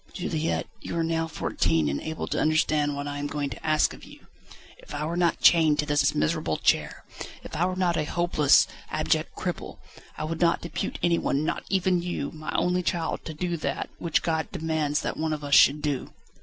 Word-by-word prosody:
"Juliette, 165 -3 -2 0.2
you 170 - -5
are 165 - +1
now 165 0 0
fourteen, 80 - 0
and 70 0 -2
able 160 0 -4
to - - -1
understand 155 -2 +2
what 145 0 -4
I 145 0 -4
am 145 - -2
going 145 -1 -3
to 115 - -9
ask 155 -1 +2
of - - -13
you. - - -14 0.5
If - - -10
I 150 +1 -2
were 165 +2 -3
not 175 -1 +1
chained 160 -3 +6
to 150 - 0
this 145 -1 +2
miserable 75 +1 0
chair, - - 0 0.4
if - - -8
I 175 +3 +2
were 185 - -2
not 180 -2 +1
a 155 - 0
hopeless, 170 -4 +4 0.2
abject - - 0
cripple, - - -4 0.4
I - - -4
would 160 +2 -4
not 170 -1 +3
depute 170 - -4
anyone, 170 -4 +1
not - - -2
even 185 -2 +2
you, 175 -5 -3
my 155 -1 -6
only 180 0 +2
child, 170 -2 -2
to 160 - -6
do 175 +1 -2
that, 140 -3 -3
which 170 -2 0
God 160 -1 -1
demands 155 -2 -1
that - - -3
one 160 0 -1
of 150 -1 -5
us 140 -1 -3
should 145 +2 +6
do." 145 -4 -2
155 Hz, 210 wpm, -26 LUFS, 145-170 Hz, 0.5 s, chained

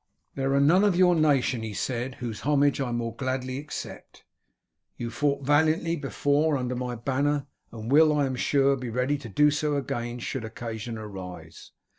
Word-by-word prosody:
"There 135 0 0
are - - +4
none 165 +8 +5
of 205 -4 +3
your 180 0 +5
nation," 140 -7 +2
he 110 -2 -5
said, 125 +2 -3
"whose 115 -4 -5
homage 145 -1 +2
I 125 -3 -2
more 115 -1 -3
gladly 130 0 -3
accept. 150 +2 -8 0.7
You 120 -1 -4
fought 140 0 0
valiantly 160 +3 +2
before 145 0 +1
under 125 -1 -2
my 125 0 -3
banner, 140 +4 0 0.3
and 115 +1 -6
will, 155 +2 +6
I 145 -2 +2
am 130 -1 -2
sure, 140 +1 +2
be 125 -2 -5
ready 125 +5 0
to 125 -5 -9
do 150 +9 +4
so 150 0 0
again 120 -3 -3
should 125 0 -4
occasion 115 0 -6
arise. 95 -4 -9
135 Hz, 175 wpm, -26 LUFS, 120-145 Hz, 0.7 s, will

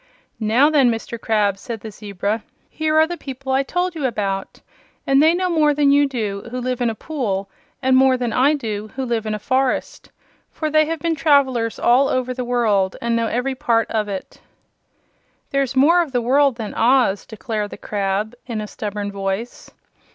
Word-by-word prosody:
"Now 240 +7 +3
then, 275 -5 +4
Mr. 230 0 -4
Crab," 205 -3 +1
said 230 -3 -6
the 220 - -8
zebra, 205 +1 -3 0.3
"here 310 0 -1
are 315 - +6
the 345 +2 -5
people 270 -2 -6
I 265 +1 +3
told 355 +6 -1
you 300 -5 -1
about; 195 -4 -3 0.5
and 275 +1 +4
they 320 +2 +5
know 365 +1 0
more 310 -4 +2
than 285 -1 +3
you 285 0 +4
do, 215 -6 -4
who 250 +2 -4
lives 250 0 -3
in 240 - +2
a 225 - -4
pool, 200 -9 -3 0.3
and 260 0 +4
more 260 0 +5
than 245 -3 -2
I 275 +6 +3
do, 215 -6 -4
who 265 0 -2
lives 230 -3 -2
in 215 - -1
a - - -3
forest. 260 +4 -1 0.4
For 310 -1 -4
they 310 0 +4
have 330 +1 -2
been 335 -1 +1
travelers 270 -6 +2
all 255 +3 +4
over 255 0 -1
the 250 0 -4
world, 220 -6 +1
and 235 0 -1
know 230 0 +1
every 250 +4 -1
part 240 -4 0
of 215 -2 0
it." 195 -2 -7 1.1
"There 275 - +2
is 270 -1 -2
more 325 +7 +5
of 305 -6 -4
the 245 - +2
world 275 +2 +3
than 220 -3 -6
Oz," 235 -4 +3
declared 215 -1 -4
the - - -9
crab, 205 +2 -2
in 230 -3 -3
a 215 - -4
stubborn 205 -1 -5
voice. 195 +4 -4
245 Hz, 200 wpm, -20 LUFS, 215-275 Hz, 1.1 s, are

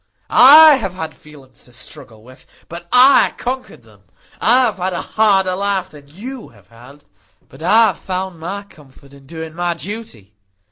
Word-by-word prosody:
I 300 +2 +8
have 190 -8 -6
had 160 -4 -7
feelings 140 -4 -17
to 125 - -20
struggle 115 -2 -11
with; 130 +2 -18 0.2
but 170 +1 -11
I 255 +3 +5
conquered 255 - -6
them. 105 -3 -22 0.4
I 245 +3 +3
have 220 -5 -1
had 185 0 -3
a 175 - -4
harder 195 -4 +1
life 195 -1 -3
than 145 -2 -15
you 230 - -10
have 100 -2 -23
had; 130 +5 -17 0.4
but 135 - -17
I 220 +7 +4
have 185 - -7
found 185 -2 -6
my 195 +5 -6
comfort 140 -6 -20
in 140 -1 -18
doing 160 0 -9
my 175 0 -3
duty. 170 - -9
175 Hz, 175 wpm, -17 LUFS, 140-205 Hz, 0.4 s, I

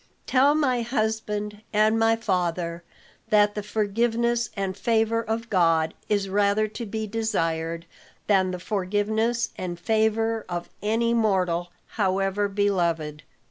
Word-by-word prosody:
"Tell 275 +3 +4
my 260 -5 +2
husband 215 -3 -2
and 215 +1 +3
my 225 0 +4
father, 175 -5 -2 0.5
that 210 -1 +4
the 210 - -3
forgiveness 230 +3 0
and 195 -1 -2
favor 225 +2 +1
of 230 +1 -3
God 165 -5 +2 0.2
is 205 -2 +1
rather 205 +2 +2
to 230 +2 -6
be 220 +1 -3
desired 170 -7 -2 0.4
than 190 -3 +3
the 180 - -3
forgiveness 215 +5 0
and 175 -2 -4
favor 220 +2 +1
of 175 -1 -4
any 230 +2 +1
mortal, 185 -6 +1 0.2
however 195 0 0
beloved. 170 -7 0
210 Hz, 125 wpm, -25 LUFS, 185-225 Hz, 0.5 s, Tell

